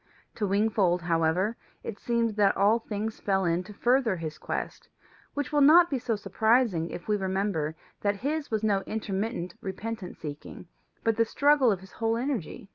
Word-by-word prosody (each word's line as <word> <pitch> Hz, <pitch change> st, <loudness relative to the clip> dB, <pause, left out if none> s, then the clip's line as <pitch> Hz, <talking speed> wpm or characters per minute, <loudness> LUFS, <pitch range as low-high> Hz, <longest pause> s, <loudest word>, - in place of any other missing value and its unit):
To 210 Hz, -, -2 dB
Wingfold, 195 Hz, -3 st, +2 dB
however, 170 Hz, +6 st, +1 dB, 0.3 s
it 205 Hz, -4 st, -6 dB
seemed 235 Hz, -1 st, 0 dB
that 205 Hz, -2 st, +3 dB
all 210 Hz, +4 st, +4 dB
things 215 Hz, 0 st, -4 dB
fell 190 Hz, -2 st, +1 dB
in 170 Hz, +1 st, +1 dB
to 215 Hz, -, -10 dB
further 245 Hz, -2 st, +2 dB
his 160 Hz, -3 st, -6 dB
quest, -, -, -5 dB, 0.5 s
which 285 Hz, -1 st, -2 dB
will 295 Hz, -, +4 dB
not 335 Hz, +4 st, +7 dB
be 270 Hz, -, 0 dB
so 230 Hz, -1 st, -1 dB
surprising 220 Hz, -5 st, +1 dB
if 175 Hz, -, -8 dB
we 210 Hz, -, +2 dB
remember 190 Hz, -5 st, -1 dB, 0.3 s
that 205 Hz, -1 st, 0 dB
his 305 Hz, 0 st, -1 dB
was 220 Hz, -1 st, -1 dB
no 200 Hz, -3 st, +2 dB
intermittent 205 Hz, -3 st, -3 dB
repentant 200 Hz, 0 st, -5 dB
seeking, 150 Hz, +3 st, -8 dB, 0.4 s
but 225 Hz, -1 st, +1 dB
the 230 Hz, -, +5 dB
struggle 280 Hz, -1 st, +4 dB
of 190 Hz, -3 st, -2 dB
his 190 Hz, -, -14 dB
whole 225 Hz, 0 st, -1 dB
energy. 245 Hz, -, -3 dB
210 Hz, 175 wpm, -28 LUFS, 190-230 Hz, 0.5 s, not